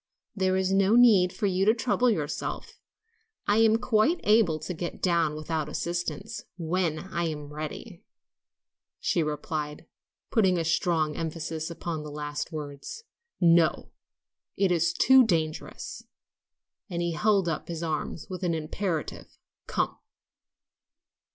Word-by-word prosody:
"There's 190 -1 +1
no 195 +3 +4
need 210 -7 +6
for 205 - -3
you 190 -1 +1
to 220 +2 +5
trouble 245 +1 +2
yourself, 155 -8 -3 0.7
I 205 +1 +3
am 225 0 +5
quite 250 +9 +2
able 210 -7 +4
to 155 +4 -5
get 175 +1 -5
down 170 -4 +1
without 155 0 -3
assistance, 200 +7 -3 0.2
when 170 -1 0
I'm 155 -4 -3
ready," 155 0 -7 1.0
she - - +1
replied, 150 0 -3 0.5
putting 190 -6 +3
a 165 - -1
strong 160 -1 +1
emphasis 160 0 -4
upon 170 -1 -4
the 150 - -7
last 150 +2 -4
words. 150 - -7 0.4
"No; 170 -2 +3 0.7
it 195 -2 +2
is 170 -1 +2
too 260 +8 +6
dangerous," 160 -7 -2 0.9
and 175 -2 -3
he 170 - 0
held 200 +1 +2
up 160 -2 -2
his 170 -1 -5
arms 160 0 -3
with 185 -1 -6
an 175 -3 0
imperative, 160 +1 -4 0.3
"Come!" - - -1
170 Hz, 125 wpm, -27 LUFS, 155-195 Hz, 1.0 s, need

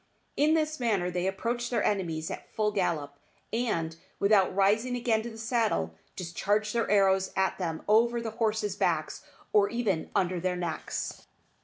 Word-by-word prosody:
In 305 +2 +4
this 310 -1 0
manner 200 -7 +1
they 180 +1 -1
approach 235 +5 -2
their 235 -4 0
enemies 165 -6 -1
at - - -8
full 210 -1 0
gallop, 165 -8 -1 0.4
and, 170 -9 -1 0.2
without 200 -2 +3
rising 215 +6 +2
again 235 -2 +1
to 235 - -6
the 225 - -10
saddle, 220 - 0 0.2
discharge 205 +4 -1
their 235 -1 0
arrows 195 -2 +3
at 190 0 +1
them 165 -3 -3
over 235 +3 +4
the 230 -1 -4
horses' 215 -3 0
backs, - - 0 0.3
or 205 -1 +5
even 215 -8 -1
under 180 -1 +1
their 180 +1 -1
necks. 175 -3 -4
205 Hz, 160 wpm, -29 LUFS, 180-230 Hz, 0.4 s, or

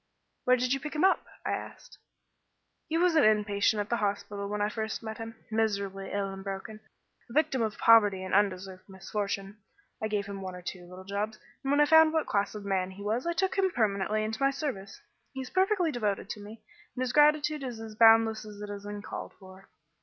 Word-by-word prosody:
"Where 255 0 +5
did 250 +1 +1
you 270 - 0
pick 300 +2 -6
him 305 - +1
up?" 380 - +3 0.2
I - - 0
asked. - - -7 0.9
"He 320 - 0
was 355 0 +3
an 315 - +5
in 215 -1 +4
patient 205 +1 +1
at 205 - -6
the 235 - +1
hospital 200 -1 -2
when 210 0 -2
I 205 - +2
first 220 0 -4
met 220 0 -6
him, 225 0 -7 0.2
miserably 200 -3 -1
ill 200 -1 -2
and 195 0 -8
broken, 195 +2 -6 0.5
a - - -10
victim 275 -3 +2
of 220 -2 -1
poverty 205 -5 +5
and 185 - -5
undeserved 190 -1 0
misfortune. 195 +1 -4 0.4
I 220 - 0
gave 210 -2 -1
him 200 -1 -7
one 185 -1 -6
or 180 - -10
two 180 0 -6
little 180 +1 -11
jobs, 205 +2 -3 0.3
and 270 - -2
when 285 +1 +4
I - - +7
found 320 +1 +6
what 320 -1 +1
class 205 +1 -1
of 205 -1 -7
man 190 -2 0
he 195 +2 -10
was 225 +8 -1
I 340 - +1
took 380 +2 0
him 380 -1 +3
permanently 215 - 0
into 220 +3 -4
my 275 - +5
service. 265 -9 -5 0.3
He 265 - -4
is 255 - -8
perfectly 375 -3 +2
devoted 210 -6 -2
to - - -6
me, 210 +2 -11 0.3
and 255 - -1
his 250 -1 -2
gratitude 300 0 +4
is 245 -4 -5
as 225 -1 -8
boundless 225 0 +5
as 210 -1 -10
it 205 0 -6
is 200 0 -7
uncalled 205 0 -7
for." 190 0 -15
215 Hz, 220 wpm, -29 LUFS, 200-255 Hz, 0.9 s, I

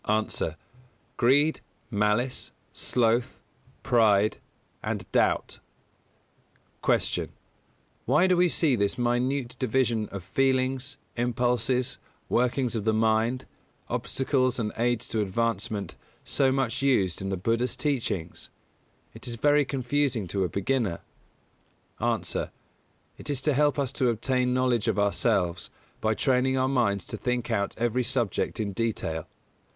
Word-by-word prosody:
_ 110 +1 0
A. - - -2 0.6
Greed, 145 +6 +3 0.3
Malice, 105 +4 0 0.2
Sloth, 120 +1 +1 0.5
Pride, 110 -5 +3 0.4
and - - -3
Doubt. - - +1 1.2
248. - - +1
Q. - - -24 0.7
_Why 150 +9 +4
do 185 - +4
we 180 0 +4
see 155 -5 +3
this 100 -3 0
minute 125 +1 0
division 120 -3 +1
of 100 -3 -7
feelings, 130 +5 0 0.2
impulses, 125 +1 0 0.3
workings 125 0 +1
of 110 - -1
the 110 0 +2
mind, 115 +3 +1 0.4
obstacles 130 -2 0
and 110 -3 -1
aids 120 0 0
to 110 - 0
advancement 105 -2 -2 0.3
so 135 -2 +2
much 130 -1 0
used 100 -12 +2
in 95 - -3
the 95 - -1
Buddha's 115 +6 0
teachings? 115 - -2 0.6
It - - -6
is 120 - -3
very 145 +4 +3
confusing 135 -3 0
to 95 +2 0
a 90 - -1
beginner._ 100 0 -1 1.3
A. - - -2 0.7
It - - -9
is 140 -3 0
to 150 +2 +2
help 145 0 +2
us 140 -3 0
to 130 -3 +1
obtain 125 +2 0
knowledge 125 -3 +1
of - - +1
ourselves, 100 -3 +1 0.3
by 110 0 +1
training 130 +1 +2
our 130 0 +2
minds 115 -8 +1
to - - -6
think 125 -1 -2
out 100 -3 -1
every 120 +2 +1
subject 120 -5 -1
in 105 -2 -1
detail. 95 -7 -2
120 Hz, 130 wpm, -27 LUFS, 110-130 Hz, 1.3 s, Why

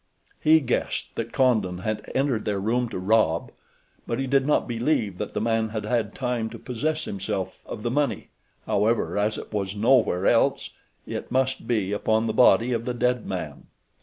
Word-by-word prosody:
He 160 +1 +5
guessed 125 -3 -2
that - - -4
Condon 110 -9 +2
had 105 +3 -4
entered 130 -5 +1
their 100 -2 -1
room 120 +4 0
to - - -5
rob; 90 -4 +2 0.6
but 115 - -1
he 135 - -1
did 135 +1 +2
not 150 - +2
believe 115 - 0
that 105 - -5
the - - +1
man 115 0 +1
had 110 -1 -4
had 110 -2 -1
time 125 -4 -2
to - - -9
possess 155 +6 -2
himself 95 -1 -4
of 105 - -7
the 120 - -1
money; 145 +2 -1 0.4
however, 110 +2 +1
as 105 +1 0
it - - -9
was 100 -1 -2
nowhere 110 -4 +3
else, - - +2 0.3
it - - -5
must 130 0 0
be 105 -5 0
upon 110 +2 +1
the 110 - -1
body 120 +1 +5
of 115 0 -2
the 125 -1 -2
dead 125 -1 0
man. - - -5
115 Hz, 185 wpm, -25 LUFS, 105-125 Hz, 0.6 s, He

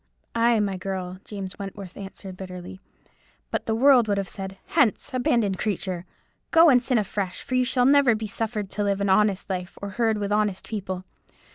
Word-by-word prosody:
'" - - -41
"Ay, 230 0 +4
my 200 -2 0
girl," 185 -1 -4
James 195 -2 -7
Wentworth 195 -2 -7
answered, 195 -1 -8
bitterly, 185 0 -8 0.7
"but - - -2
the 220 - +1
world 250 -1 +6
would 205 -1 +1
have 195 -1 -1
said, 195 0 -6
'Hence, 270 -9 +1
abandoned 235 -6 +1
creature! 185 -3 -2 0.4
go, 330 -2 +7
and 250 -2 +5
sin 250 0 +1
afresh; 200 -3 -2
for - - -6
you 255 0 +4
shall 250 -1 +2
never 275 -3 +5
be 220 0 -4
suffered 210 -1 -3
to 210 - -1
live 200 -1 0
an 200 0 0
honest 200 0 +3
life, 180 -2 -4
or 200 - -5
herd 220 +2 +1
with 205 -1 -3
honest 210 -2 0
people. 190 -4 -4
205 Hz, 190 wpm, -25 LUFS, 190-230 Hz, 0.7 s, go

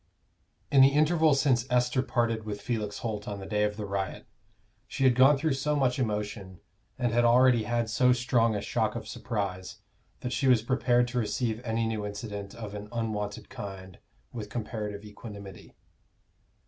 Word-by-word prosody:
_ - - -43 0.7
In 135 - +8
the 135 - +9
interval 155 +1 +3
since 130 -4 +2
Esther 125 +1 +2
parted 115 -3 0
with 105 -1 -5
Felix 110 -4 -3
Holt 105 -2 -3
on 100 -1 -4
the 95 - -7
day 105 +1 -1
of 105 0 -3
the 105 - -4
riot, 100 -1 -3 0.6
she 135 - -3
had 130 -2 +6
gone 135 +4 +6
through 150 +1 0
so 150 +3 0
much 135 -3 +1
emotion, 105 -5 -3 0.4
and 120 -2 0
had 120 +1 +3
already 120 -1 +5
had 120 0 0
so 125 +3 +3
strong 120 -2 +2
a 100 - -2
shock - - -1
of - - -6
surprise, 95 -4 -4 0.4
that 125 - -3
she 135 - +1
was 125 -4 +5
prepared 120 -1 +2
to 125 0 -1
receive 110 +1 -1
any 115 -1 -1
new 110 -2 -2
incident 100 0 -6
of 110 -3 -7
an 105 0 -7
unwonted 105 -3 -3
kind 95 -2 -8 0.3
with 110 -4 -6
comparative 105 -3 -5
equanimity. 100 -2 -10
115 Hz, 175 wpm, -28 LUFS, 105-125 Hz, 0.7 s, the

